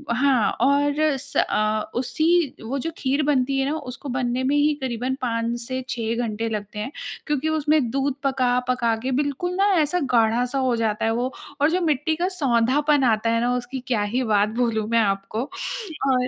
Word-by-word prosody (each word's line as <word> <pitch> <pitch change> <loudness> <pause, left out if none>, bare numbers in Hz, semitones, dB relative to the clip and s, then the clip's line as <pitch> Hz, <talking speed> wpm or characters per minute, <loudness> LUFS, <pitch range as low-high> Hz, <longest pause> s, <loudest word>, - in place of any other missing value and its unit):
हाँ 255 -3 +3
और 285 +2 +3 0.2
स 280 +1 -6
अ, 215 0 +1
उसी 315 +4 +1
वो 245 +5 -3
जो 330 +5 -3
खीर 275 +3 0
बनती 275 -2 +1
है 270 - +1
ना 305 - -1
उसको 260 +1 -8
बनने 255 0 -1
में 275 +2 +1
ही 295 +1 +3
करीबन 255 0 -2
5 235 0 -1
से 255 +2 -3
6 230 -1 -2
घंटे 225 +1 -3
लगते 210 -1 -5
हैं, 215 +6 -4 0.4
क्योंकि 295 +1 0
उसमें 300 -4 +2
दूध 275 +1 0
पका-पका 250 -3 +1
के 265 - -1
बिल्कुल 285 +6 -1
ना 390 +2 +3 0.2
ऐसा 330 +4 +1
गाढ़ा-सा 240 +3 +2
हो 255 -2 +1
जाता 225 -1 0
है 225 - +2
वो, 250 +2 -1 0.3
और 295 - +5
जो 365 +2 +1
मिट्टी 315 -1 +1
का 350 +3 0
सोंधापन 275 +1 +2
आता 230 -2 +2
है 230 0 +2
ना 245 +1 +1
उसकी 250 +2 -4
क्या 235 -6 +1
ही 255 - +1
बात 210 -2 +2
बोलूँ 225 -3 0
मैं 230 0 +3
आपको। 195 0 -1 0.7
और 255 -1 +2
255 Hz, 190 wpm, -23 LUFS, 230-285 Hz, 0.7 s, और